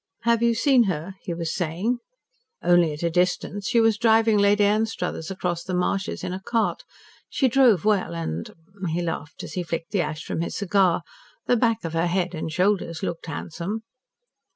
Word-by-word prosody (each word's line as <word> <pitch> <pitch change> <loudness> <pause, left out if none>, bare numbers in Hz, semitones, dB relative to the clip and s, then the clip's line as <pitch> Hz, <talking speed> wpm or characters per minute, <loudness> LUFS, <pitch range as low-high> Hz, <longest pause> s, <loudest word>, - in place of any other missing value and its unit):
"Have 235 0 +3
you 235 -1 +3
seen 255 -1 +4
her?" 180 0 -3
he 185 - -5
was 165 -1 -3
saying. 185 +8 -1 0.6
"Only 175 -2 +4
at 150 +2 -6
a 170 - +1
distance. 180 +3 0
She 235 - +3
was 225 -2 +3
driving 225 -2 +4
Lady 205 +1 +4
Anstruthers 205 -6 -1
across 180 -3 -2
the 185 - -3
marshes 185 +2 -1
in 180 - -3
a 185 - -4
cart. 225 +2 0 0.5
She 270 - +2
drove 240 - +4
well 200 - +1
and 80 0 -4 0.2
" 190 -2 -6
he 175 +1 -1
laughed 160 -3 -5
as - - -8
he 180 - -2
flicked 165 -1 -4
the 200 - +2
ash 155 0 -4
from - - -3
his 170 - -3
cigar 195 -2 +2 0.4
"the 245 - +3
back 230 -3 +1
of 165 - -4
her 165 +1 +1
head 180 0 0
and 160 -1 -4
shoulders 185 -1 0
looked 170 -2 -4
handsome." 170 +7 -5
185 Hz, 190 wpm, -24 LUFS, 170-220 Hz, 0.6 s, seen